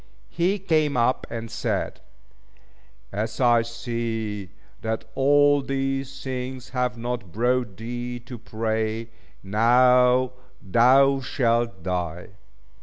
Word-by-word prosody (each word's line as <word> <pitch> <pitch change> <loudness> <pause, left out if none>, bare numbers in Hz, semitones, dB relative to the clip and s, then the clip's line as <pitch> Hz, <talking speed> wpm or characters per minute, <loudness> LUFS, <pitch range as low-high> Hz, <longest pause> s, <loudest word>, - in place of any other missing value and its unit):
He 180 +4 +1
came 155 -7 +1
up 120 +2 +1
and 115 -1 -6
said - - -2 1.1
"As 110 +3 -3
I 120 -2 +5
see 115 -4 -4 0.3
that 110 0 -3
all 145 +2 +4
these 135 0 -3
things 130 -1 -5
have 125 -2 -1
not 120 -5 -4
brought 120 0 0
thee 120 +2 -5
to 120 0 -9
pray, 110 0 -2 0.3
now 125 +4 +4 0.3
thou 130 +7 +4
shalt 115 -7 0
die." 90 0 -3
120 Hz, 105 wpm, -24 LUFS, 110-130 Hz, 1.1 s, I